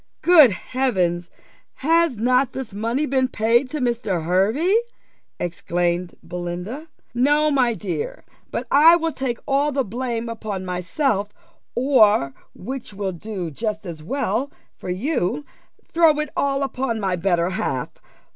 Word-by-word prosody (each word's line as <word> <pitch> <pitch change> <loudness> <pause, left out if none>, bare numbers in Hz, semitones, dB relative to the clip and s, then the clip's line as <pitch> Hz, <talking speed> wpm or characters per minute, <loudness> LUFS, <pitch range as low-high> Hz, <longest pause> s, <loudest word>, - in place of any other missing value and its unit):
"Good 325 -7 +8
Heavens! 185 -6 -1 0.5
Has 330 -2 +2
not 250 +3 +2
this 260 -6 -6
money 230 +8 -1
been 260 -2 +1
paid 235 +2 +2
to 305 - -4
Mr. 230 - -1
Hervey?" 215 - +2 0.6
exclaimed 175 0 -1
Belinda. 180 - -5 0.3
"No, 295 +5 +3
my 250 -5 +2
dear; 175 -6 -4 0.2
but - - -3
I 315 +4 +8
will 330 -1 0
take 260 -5 -3
all 280 +2 +2
the 275 -1 0
blame 235 +1 -3
upon 215 -4 -5
myself, 195 - -1 0.5
or, 220 - +4 0.2
which 240 0 -7
will 195 -1 -2
do 185 -2 -5
just 210 - -4
as 165 -3 -7
well 270 - -2 0.2
for - - -8
you, 225 - -1 0.5
throw 325 -3 +5
it 300 -1 -3
all 275 0 +1
upon 260 -4 -2
my 190 -3 0
better 175 0 +1
half. 130 -8 -2
230 Hz, 135 wpm, -22 LUFS, 185-275 Hz, 0.6 s, Good